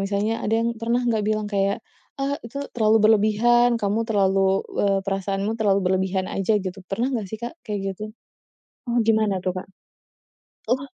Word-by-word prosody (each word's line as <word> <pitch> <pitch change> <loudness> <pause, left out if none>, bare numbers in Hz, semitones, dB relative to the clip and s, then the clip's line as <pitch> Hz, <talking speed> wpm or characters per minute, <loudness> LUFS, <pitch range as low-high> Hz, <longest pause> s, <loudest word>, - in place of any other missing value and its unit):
misalnya 200 +3 -1
ada 220 - 0
yang 235 - +1
pernah 235 +2 0
nggak 230 -3 +1
bilang 215 0 0
kayak, 200 -1 0 0.3
"Ah 280 +1 -1
itu 235 +4 -10 0.2
terlalu 220 -2 +3
berlebihan, 225 +3 +4
kamu 210 0 0
terlalu 195 -2 +2 0.2
eee, 195 -1 +2
perasaanmu 195 +1 -1
terlalu 200 -2 +3
berlebihan 190 0 0
aja." 195 +2 +1
gitu. 195 -1 -4
Pernah 240 +7 -1
nggak 220 -5 -2
sih 220 - -5
Kak 235 +2 -6 0.2
kayak 205 -1 -2
gitu? 190 - -11 0.8
Oh 240 -1 +2
gimana 215 -4 +2
tuh 185 - 0
Kak? 185 - -7 1.0
Oh 260 +3 +1
210 Hz, 165 wpm, -23 LUFS, 195-230 Hz, 1.0 s, berlebihan